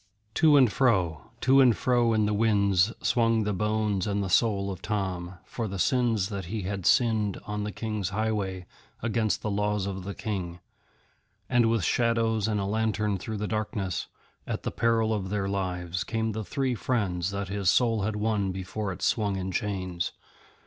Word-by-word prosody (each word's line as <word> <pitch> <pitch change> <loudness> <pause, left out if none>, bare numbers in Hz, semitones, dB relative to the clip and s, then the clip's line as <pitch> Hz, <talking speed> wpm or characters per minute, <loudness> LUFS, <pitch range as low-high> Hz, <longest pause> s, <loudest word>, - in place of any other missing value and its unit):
To 155 0 +5
and 130 -6 +5
fro, 90 - +1
to 135 +1 +5
and 125 -4 +5
fro 120 -2 +2
in 110 -1 +2
the 105 - 0
winds 100 -2 +3
swung 115 -2 +3
the 105 0 -1
bones 105 -1 0
and 100 0 0
the 95 - -3
soul 100 -2 +2
of 95 -1 -7
Tom, 95 -4 -3
for 115 -2 -4
the 100 -1 -5
sins 115 - +1
that 100 -3 -4
he 105 +3 -4
had 95 -1 -2
sinned 110 -5 +3
on 105 0 -3
the 105 - -3
King's 105 -3 -3
highway 100 -3 -2 0.4
against 110 -2 0
the 105 - -1
laws 105 0 0
of 95 -1 -4
the 100 +1 -6
King; 90 -5 -4 0.9
and 120 -2 +3
with 115 -4 +1
shadows 115 -1 +1
and 105 -2 0
a 100 - -1
lantern 105 -1 0
through 110 +3 -5
the 105 +1 -2
darkness, 105 -3 -2 0.4
at - - -3
the - - -2
peril 115 -1 +2
of 95 -3 -2
their 100 -1 -1
lives, 90 -3 -2
came 110 -1 -1
the 110 +1 -4
three 135 +3 -1
friends 100 -8 -1
that 100 -1 -4
his 100 -2 +1
soul 115 +1 +3
had 105 +2 -1
won 105 -2 0
before 95 +2 -4
it 90 - -7
swung 105 -3 +1
in 95 0 -3
chains. 95 -3 -2
105 Hz, 185 wpm, -27 LUFS, 95-110 Hz, 0.9 s, To